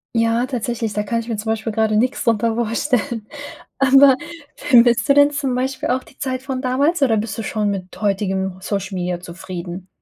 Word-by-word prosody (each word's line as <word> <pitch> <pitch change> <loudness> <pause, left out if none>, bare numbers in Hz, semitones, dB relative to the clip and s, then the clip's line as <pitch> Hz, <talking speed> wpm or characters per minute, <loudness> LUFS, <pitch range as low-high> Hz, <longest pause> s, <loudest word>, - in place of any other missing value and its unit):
Ja, 230 +1 +2
tatsächlich, 240 -3 -3
da 210 - -1
kann 230 +2 -1
ich 230 - -9
mir 225 -3 -3
zum 220 +1 -3
Beispiel 220 0 -3
grade 220 -1 +1
nix 250 +4 0
drunter 230 -1 +1
vorstellen. 235 0 -1 0.5
Aber 270 0 +6 0.4
vermisst 240 -1 +4
du 280 - +6
denn 285 0 +6
zum 280 -3 -2
Beispiel 265 +4 -2
auch 255 +1 0
die - - -20
Zeit 260 -2 -3
von 265 -1 -4
damals, 280 +6 +1
oder 240 -5 +4
bist 215 +1 -3
du - - -2
schon 210 0 -1
mit 185 -2 -6
heutigem 190 -2 -1
Social 195 -1 -3
Media 180 -1 -2
zufrieden? 180 +1 -8
230 Hz, 190 wpm, -20 LUFS, 205-260 Hz, 0.5 s, Aber